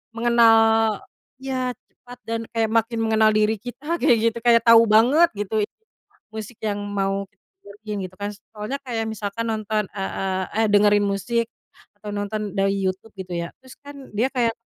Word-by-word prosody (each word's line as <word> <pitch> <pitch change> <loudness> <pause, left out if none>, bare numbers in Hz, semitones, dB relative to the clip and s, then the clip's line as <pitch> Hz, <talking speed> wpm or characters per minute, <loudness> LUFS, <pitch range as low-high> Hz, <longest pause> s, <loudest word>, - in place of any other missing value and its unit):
mengenal 225 -2 +4 0.4
ya 260 -1 -2
cepat, 245 0 -16
dan 230 0 -2
kayak 225 -1 +1
makin 230 0 +1
mengenal 220 -1 +3
diri 215 +1 +2
kita 255 +8 -4
kayak 235 - +4
gitu. 235 - -10
Kayak 235 -1 +5
tahu 230 0 +8
banget 245 +11 +5
gitu 210 +1 0 0.7
musik 220 +1 -7
yang 205 -1 -1
mau 200 -1 -1
kita - - -41 0.2
dengerin 210 +1 -7
gitu - - -20
kan. 205 0 -3 0.2
Soalnya 215 +6 -4
kayak 230 -4 -3
misalkan 220 +1 -4
nonton, 215 -1 -1
e 195 - -4
e 190 - -3 0.4
eh - - +1
dengerin 205 0 +4
musik 225 +4 -1 0.5
atau 210 -1 -8
nonton 205 0 -3
dari 195 0 +2
YouTube 190 +3 -3
gitu 185 -1 -7
ya, 170 0 -3
terus 260 -1 -14
kan 285 -2 -11
dia 230 +5 +2
kayak 240 -3 +1
220 Hz, 170 wpm, -23 LUFS, 205-235 Hz, 0.7 s, tahu